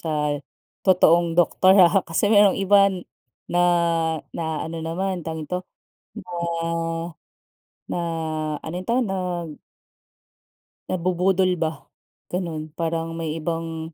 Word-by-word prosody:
sa 150 -2 -1 0.4
totoong 170 -3 +4
doktor, 185 +3 +4
ah. 185 +1 +6
Kasi 200 +6 +1
yung 205 -2 +6
iba 195 0 +5 0.6
na 175 - +3 0.7
na-aano 160 0 -4
naman 180 +3 -2
tawag 160 -1 -5
dito 180 +3 -5 0.7
na 170 - -3 1.5
na - - -3 0.6
ano 160 - -7
ito, 230 - -1
nag 180 -6 -2 1.4
nabubudol 185 +1 +1
ba 160 -3 -2 0.5
ganun, 160 -4 -4
parang 165 0 -2
may 165 -1 -3
ibang 165 0 -4
170 Hz, 100 wpm, -23 LUFS, 160-185 Hz, 1.5 s, ah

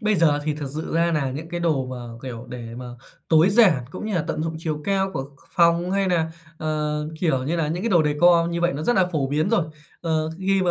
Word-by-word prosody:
bây 215 -1 +2
giờ 155 -5 +4
thì 155 -1 0
thật 150 -2 -5
sự 155 +1 -4
ra 170 +1 +2
nà 145 -4 0
những 150 +5 -6
cái 175 +1 -4
đồ 155 -6 +1
mà, 130 0 -6 0.3
kiểu, 125 -2 -7
để 120 -2 -7
mà 125 0 -7 0.4
tối 160 +3 +5
giản 195 - +5
cũng 200 - -6
như 215 - -2
là 165 -4 0
tận 155 - -1
dụng 165 0 -3
chiều 155 -2 -3
cao 195 -1 +1
của 135 - -3
ph 140 +1 -16 0.2
phòng, 170 0 +4
hay 195 0 +1
nà, 165 -3 +1 0.3
ờ, 150 -1 -1 0.2
kiểu 135 -7 +1
như 160 +5 -1
là, 160 -3 0
những 175 +4 -2
cái 230 - -1
đồ 170 -4 +5
decor 170 +3 +4
như 170 0 -2
vậy 175 0 +2
nó 145 - -4
rất 240 +7 +2
là 185 -1 +4
phổ 145 -4 0
biến 155 +5 +1
rồi. 230 -8 +3 0.4
Ờ, 160 -2 0
khi 190 0 +1
mà 180 - +2
160 Hz, 265 wpm, -23 LUFS, 150-175 Hz, 0.4 s, tối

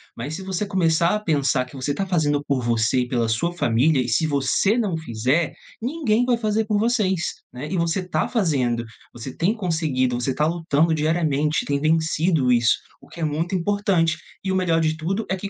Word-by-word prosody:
mas 140 +7 -5
se 190 - -7
você 190 +1 -2
começar 170 -2 +2
a - - -1
pensar 140 -8 +1
que 130 - -15
você 135 +2 -2
tá 195 - -2
fazendo 150 -6 +1
por 140 -3 0
você 120 +1 +1
e 125 - -2
pela 120 -2 0
sua 120 +11 0
família 135 -1 +2
e 125 - -3
se 120 +8 +2
você 145 - +1
não 205 -8 0
fizer, 135 +3 0 0.3
ninguém 245 -3 +1
vai 245 -1 +2
fazer 220 -1 0
por 210 -1 0
vocês, 205 -6 +1 0.2
né, 130 +4 -7
e 190 - -1
você 170 +2 -1
tá - - 0
fazendo, 130 - 0 0.3
você 120 +2 -8
tem 180 +6 +1
conseguido, 160 - 0
você 125 +2 -1
tá 150 - +1
lutando 165 -1 +1
diariamente, 155 -1 0
tem 140 0 0
vencido 160 -2 +2
isso, 120 -1 +4 0.3
o - - -17
que - - -12
é - - -1
muito 160 +5 -2
importante. 185 -3 +1 0.3
E 190 - -1
o - - 0
melhor 180 -3 +2
de 155 0 +1
tudo 190 +7 -2
é 190 - +1
que 195 +1 -6
160 Hz, 205 wpm, -22 LUFS, 135-190 Hz, 0.3 s, isso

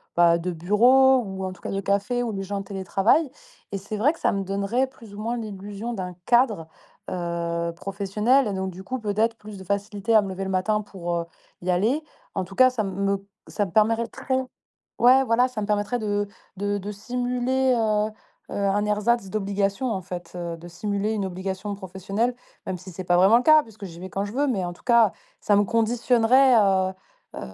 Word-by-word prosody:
bah, 170 -1 +5
de 180 +2 -3
bureaux 245 +10 +5
ou 190 -1 -5
en 185 - -4
tout - - -18
cas - - -5
de 195 - -1
cafés, 200 +5 0
où 230 - -3
des 195 -1 -3
gens 200 +1 -3
télétravaillent. 195 - +1 0.4
Et 200 - -2
c'est 200 +3 -6
vrai 265 +9 +4
que 330 - -13
ça - - +2
me 195 -1 -1
donnerait 200 +7 0
plus 230 -5 -15
ou - - -9
moins 235 +2 -2
l'illusion 205 +1 -6
d'un 185 -3 -5
cadre, 235 -9 +3 0.4
heu, 170 -1 -2
professionnel. 210 +8 +1
Et 205 - -2
donc 190 0 -2
du 185 +2 -10
coup, 255 +5 -4
peut-être 220 +2 0
plus 210 -1 -10
de 190 - -9
facilité 200 +3 -1
à 215 - +8
me 200 - -4
lever 190 +1 -4
le 190 - -4
matin 210 +3 +1
pour, 175 -4 -4
heu, 170 0 -2 0.4
y 185 - -4
aller. 215 - +2 0.3
En - - -1
tout 195 +2 -12
cas, 255 0 +7
ça 250 -3 -2
m 195 - -3
me 200 0 -1 0.2
ça 205 - -1
me 185 - -9
permettrait 230 +5 +1 0.6
ouais, 260 +2 +6
voilà, 245 +1 +3
ça 250 -4 -6
me - - -1
permettrait 210 +3 0
de 205 -1 -1 0.3
de 205 +1 -1
de 205 +1 -5
simuler, 250 +4 0
heu 215 -1 +1 0.4
heu, - - -4
un 200 +1 +1
ersatz 210 +1 +1
d'obligation, 200 +4 -1
en 190 - -2
fait, 180 -1 -8
de 170 0 -6
simuler 205 +4 -2
une 205 -3 -1
obligation 190 +2 -4
professionnelle 195 +5 -2 0.3
même 185 - -3
si 185 +1 -11
c'est 185 +2 -7
pas 175 - +3
vraiment 195 +6 +6
le 250 - 0
cas 310 -1 +7
puisque 215 -4 -11
j'y 170 -1 -10
vais 185 - -7
quand 195 +2 -2
je 205 - -7
veux 285 +3 +1
mais 200 -9 0
en 175 - -4
tout - - -20
cas 235 -5 +5 0.3
ça 205 - +3
me 205 - +4
conditionnerait, 240 +4 +3
heu 190 -3 +3 0.4
heu, - - -6
205 Hz, 210 wpm, -24 LUFS, 190-230 Hz, 0.6 s, à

